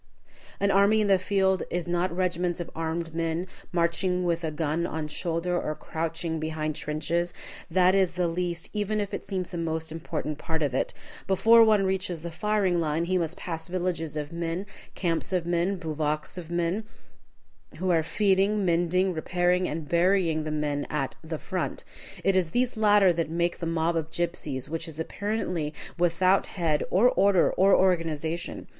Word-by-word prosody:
An 200 0 +2
army 200 +3 +5
in 215 - +2
the 195 -1 +5
field 190 0 +2
is 175 -1 -2
not 175 +1 0
regiments 175 -1 -1
of 170 - -5
armed 165 0 -3
men, 165 +1 -1 0.3
marching 180 +1 +1
with 170 -1 0
a 160 - 0
gun 155 +2 -1
on 155 -1 -3
shoulder, 170 +3 -1
or 155 - -3
crouching 165 +1 -3
behind 155 -1 -2
trenches. 170 +4 -2 0.3
That 185 0 +4
is 190 -2 +3
the 180 -1 +1
least, 175 +1 -3
even 210 0 -1
if 205 -1 -3
it - - -3
seems 185 -2 -4
the 175 - -4
most, 160 -1 -2
important 155 -2 -4
part 160 -1 -2
of 140 -3 0
it. 130 - 0 0.4
Before 225 +5 +6
one 215 -3 +4
reaches 185 -3 -1
the 170 - -5
firing 200 -1 +1
line 160 +1 0
he 185 +1 +1
must 170 0 -2
pass 165 -2 -5
villages 175 -4 -2
of 150 +1 -4
men, 170 +3 -3 0.3
camps 170 -1 -1
of 180 -3 0
men, 175 +3 +1
bivouacs 155 -3 -2
of 175 -3 -7
men, 175 +4 0 0.9
who 185 0 0
are 165 -2 +4
feeding, 195 +4 +2
mending, 175 +2 +2
repairing, 180 +2 +1
and 155 0 -4
burying 170 -2 +2
the - - -2
men 150 -1 -1
at 145 -3 -2
the 160 0 -4
"front." 185 +3 -3 0.4
It 195 +1 +3
is 180 -3 +2
these 245 +8 +1
latter 205 -4 +5
that 165 -1 -1
make 170 +1 -1
the 170 - -3
mob 165 +1 0
of 160 -1 -1
gypsies, 155 -6 -3
which 165 +2 -4
is 160 -1 -8
apparently 180 -4 -2 0.2
without 180 +2 +3
head 160 -5 0
or 205 +7 +5
order 195 -4 +4
or 195 +1 +5
organization. 165 -2 0
170 Hz, 175 wpm, -27 LUFS, 160-185 Hz, 0.9 s, Before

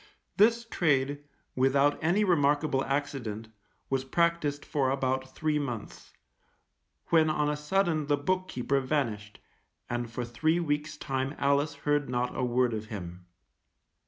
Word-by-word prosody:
This 230 +3 +4
trade, 145 -8 +1 0.3
without 140 +3 +2
any 180 +6 +3
remarkable 145 -5 +2
accident, 135 -6 -3 0.4
was 135 -1 0
practised 155 0 0
for 135 -3 0
about 130 -1 -1
three 155 -1 0
months, 120 -7 -6 1.0
when 160 -2 +4
on 150 -1 +1
a - - -1
sudden 155 0 0
the 145 -1 +2
book 185 +5 -1
keeper 135 0 0
vanished, 120 -7 -2 0.5
and 120 -1 -3
for 120 +1 -4
three 155 +8 +1
weeks' 150 -1 -2
time 135 0 -2
Alice 140 +2 +1
heard 145 -2 +1
not 125 0 -1
a 130 - -1
word 125 -1 +2
of 110 0 -4
him. 90 -4 -8
140 Hz, 135 wpm, -29 LUFS, 130-155 Hz, 1.0 s, This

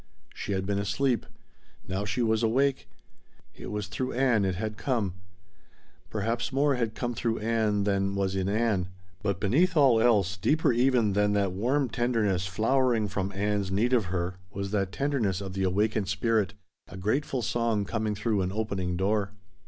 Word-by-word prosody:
She 100 - -4
had 95 0 -1
been 100 0 0
asleep. 120 +5 0 0.6
Now 95 +2 -2
she 100 +5 -1
was 110 -1 +2
awake. 135 +4 +1 0.6
It - - -9
was 105 -1 -3
through 110 +6 -3
Ann 120 -5 +2
it 95 -1 0
had 110 +3 -3
come. 110 -6 -1 1.0
Perhaps 115 +4 -2
more 140 +2 +2
had 115 -4 -1
come 120 -1 -2
through 115 -1 -1
Ann 110 -2 +1
than 100 -1 0
was 95 -1 0
in 95 0 0
Ann, 105 -4 +1 0.3
but 100 -3 -1
beneath 160 - +2
all 130 -6 +5
else, 100 -5 +3
deeper 150 - +2
even 120 -4 +3
than 105 +1 +2
that 100 -2 +1
warm 125 +9 +1
tenderness 110 -7 0
flowering 115 +2 +1
from 100 0 -2
Ann's 100 0 -1
need 110 +7 +1
of 115 -5 +3
her, 90 0 -3
was 100 -1 -4
that 100 -3 0
tenderness 120 -9 0
of 95 -2 -6
the 95 - -3
awakened 100 +2 +1
spirit 100 -1 +1 0.3
a - - -10
grateful 125 +6 -1
song 115 -2 0
coming 110 0 -2
through 105 0 0
an 90 0 -1
opening 95 -4 -2
door. 100 +1 0
105 Hz, 170 wpm, -28 LUFS, 95-120 Hz, 1.0 s, all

